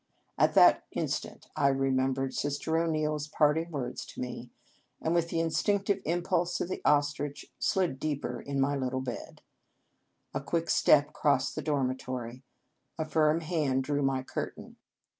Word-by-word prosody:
At - - +2
that - - +7
instant - - -3
I 140 - +3
re 135 0 +2
membered 130 0 0
Sister 145 +2 -1
O 165 0 +1
Neil 155 -1 0
s 150 -1 -4
parting 155 +2 +2
words 140 -6 -4
to - - -11
me, 125 -1 -5 0.5
and, 160 - 0
with 170 -1 +1
the - - -2
instinc 195 +5 +1
tive 200 -1 +1
impulse 175 +1 0
of - - -2
the - - -4
ostrich, 145 0 0
slid 175 -8 +1
deeper 150 -1 -3
in 140 -1 -3
my 140 +1 +2
little 130 -1 -2
bed. 125 -2 -7 0.9
A 135 - -2
quick 165 +4 -1
step 145 0 +4
crossed 130 -3 +1
the 155 - -4
dormitory. 130 -4 -2 0.6
A 160 - -1
firm 155 +1 +2
hand 150 -6 0
drew 145 +1 -1
my 135 -1 +1
curtain. - - -6
145 Hz, 160 wpm, -30 LUFS, 135-160 Hz, 0.9 s, that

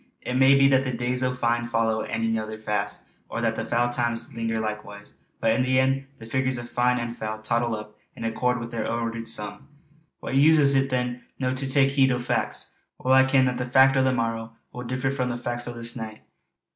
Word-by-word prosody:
It 125 - -3
may 135 +2 +6
be 135 0 +6
that 135 -1 +4
the 130 - -2
days 125 +1 -2
o' 130 0 +1
fine 120 -1 0
follow 115 -1 +1
ane 115 0 -3
anither 110 -1 -2
fast; 105 -1 -3 0.2
or - - -4
that 115 -1 +1
the 115 - -3
foul 120 +1 0
times 120 -1 -2
linger 115 -1 -2
likewise. 105 -1 -6 0.3
But 115 - +2
in 115 - +2
the 130 0 +2
end, 135 +1 +1
the 115 - -11
figures 130 +2 0
of 120 0 -6
fine 125 +1 +1
and 120 -1 -4
foul 110 -1 -4
tottle 115 +1 0
up, 105 0 -9 0.2
in - - -8
accord 125 +2 0
wi' 115 - -4
their 115 -1 -3
ordered 115 -1 -3
sum. 105 -2 -5 0.5
What - - -6
use 150 +4 +6
is 140 -2 +5
it, 135 0 +2
then, 125 -1 -1 0.2
to 130 -1 -1
no - - 0
tak' 135 +1 +2
heed 135 -1 +3
o' 125 - 0
fac's? 120 - -2 0.3
Weel 130 - +4
I 130 0 +7
ken, 130 0 +4
that 125 -1 -1
the 125 - -1
fac' 130 +2 +5
o' 130 - +4
the 130 - +3
morrow 115 -2 -2 0.2
will 125 - -6
differ 130 +2 -1
sair 140 - -5
frae 125 - 0
the 120 -1 -2
fac's 120 0 -3
o' 120 - -4
this 115 0 -4
nicht. 110 -2 -7
120 Hz, 235 wpm, -25 LUFS, 115-130 Hz, 0.5 s, I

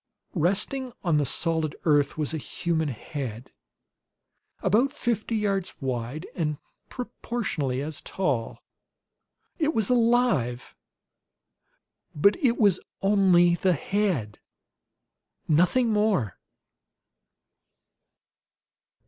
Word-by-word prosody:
Resting 205 - 0
on 170 -5 +2
the 145 - +2
solid 160 -1 +1
earth 145 -3 +3
was 155 0 -2
a 160 - -2
human 160 +2 -2
head, 130 -2 -6 1.1
about 225 +8 +3
fifty 235 -4 -2
yards 195 -3 -1
wide 130 +3 -3
and 150 -4 -2 0.3
proportionately 195 - -3
as 155 0 -5
tall. 140 -12 -2 1.0
It 310 0 +1
was 220 +1 +1
alive; 230 - +2 1.4
but 200 +8 +4
IT 265 -8 +2
WAS 200 -5 +4 0.2
ONLY 190 -4 +5
THE 180 +1 +2
HEAD, 165 - -1 1.1
NOTHING 180 +10 +3
MORE. 205 - +1
175 Hz, 90 wpm, -26 LUFS, 145-210 Hz, 1.4 s, ONLY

